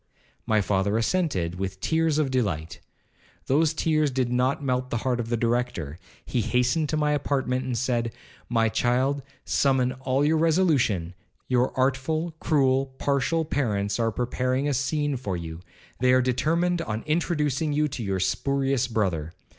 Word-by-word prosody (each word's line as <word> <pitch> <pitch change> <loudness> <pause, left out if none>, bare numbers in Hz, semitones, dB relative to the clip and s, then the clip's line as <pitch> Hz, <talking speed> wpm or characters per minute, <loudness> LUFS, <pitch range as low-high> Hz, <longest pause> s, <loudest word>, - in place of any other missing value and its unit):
My 110 -1 +3
father 100 +1 +1
assented 110 - 0
with 95 -1 -4
tears 160 +6 +1
of 145 -4 +1
delight. 90 -11 -1 0.7
Those 150 +3 +3
tears 155 -1 +1
did 130 -2 -1
not 130 +3 +1
melt 125 -1 -1
the 120 - -1
heart 125 -2 +1
of 115 -1 -3
the 120 - 0
Director; 115 - -1 0.3
he 125 - -1
hastened 125 +7 +1
to 155 - 0
my 150 -1 +1
apartment, 135 -3 0
and 125 -2 -2
said, 120 -2 0 0.4
'My 115 -1 +2
child, 130 +5 +1 0.2
summon 130 -2 +2
all 130 +2 0
your 160 +2 +3
resolution, 150 - +2 0.3
your 125 0 +2
artful, 140 +6 0
cruel, 135 -3 +2
partial 145 +4 0
parents, 105 -9 -1
are 115 -1 +1
preparing 125 +4 -1
a 145 - +1
scene 140 +2 0
for 100 -7 -3
you,—they 85 +9 -4
are 130 0 +5
determined 165 +8 +1
on 110 -7 -4
introducing 155 -2 0
you 150 +1 +2
to 125 - -5
your 95 -3 -1
spurious 135 +5 0
brother.' 90 -9 -1
130 Hz, 155 wpm, -25 LUFS, 115-145 Hz, 0.7 s, are